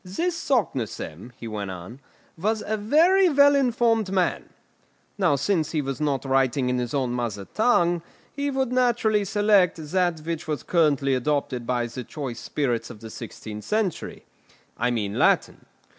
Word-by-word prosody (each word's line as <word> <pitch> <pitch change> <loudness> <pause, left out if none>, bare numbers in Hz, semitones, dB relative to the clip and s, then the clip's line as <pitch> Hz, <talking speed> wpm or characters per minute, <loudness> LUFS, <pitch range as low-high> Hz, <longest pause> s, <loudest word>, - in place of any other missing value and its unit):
"This 325 - -2
Saknussemm," 125 - -2
he 115 - -7
went 105 -3 -4
on, 95 +7 -8 0.4
"was 215 +6 -1
a 220 - -1
very 335 - +4
well 285 -1 +5
informed 235 -6 +2
man; 185 -3 0 0.7
now 145 - +3
since 155 +2 0
he 155 - +1
was 135 +2 -4
not 140 -3 0
writing 135 -1 +1
in 125 - 0
his 120 +2 -3
own 130 -3 0
mother 115 -5 -3
tongue, 175 - +2 0.3
he 285 0 -2
would 265 -2 -1
naturally 235 -4 +2
select 205 -3 +3
that 180 -3 +1
which 165 +1 -4
was 150 -5 -3
currently 145 -5 +2
adopted 130 -2 -1
by 120 -1 0
the 120 +2 -6
choice 125 -2 -6
spirits 125 -6 -2
of 105 - -11
the 110 -1 -9
sixteenth 110 -2 -8
century; 210 -5 -2 0.5
I 120 +2 0
mean 105 -4 -2
Latin. - - +2
155 Hz, 160 wpm, -25 LUFS, -, 0.7 s, well